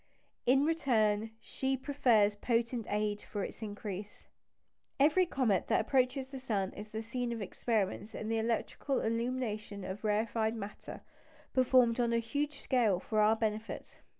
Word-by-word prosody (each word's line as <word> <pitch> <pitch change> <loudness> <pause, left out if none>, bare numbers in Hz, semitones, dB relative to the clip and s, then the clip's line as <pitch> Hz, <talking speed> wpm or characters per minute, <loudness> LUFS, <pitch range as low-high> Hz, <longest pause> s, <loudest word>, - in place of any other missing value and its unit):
In 270 +3 +5
return, 225 -9 +2
she 265 +4 -2
proffers 240 -7 +3
potent 230 +1 0
aid 210 0 0
for 205 -2 -4
its - - -7
increase. 205 -1 -6 0.7
Every 315 +6 +5
comet 225 - +1
that - - +3
approaches 260 +2 +1
the 270 - -6
sun 205 -7 -1
is 210 +1 -8
the 220 +1 -4
scene 240 +1 -3
of 230 - -3
experiments 210 0 -2
in 215 - -4
the 225 0 +1
electrical 235 +4 -1
illumination 225 -3 -2
of 190 +3 -6
rarefied 220 +1 +1
matter, 210 -2 -7 0.5
performed 255 -2 +4
on 235 -1 +2
a - - +3
huge 285 +5 -2
scale 225 -8 +2
for 215 +3 -1
our 215 +1 +5
benefit. 220 0 -3
225 Hz, 150 wpm, -33 LUFS, 210-255 Hz, 0.7 s, In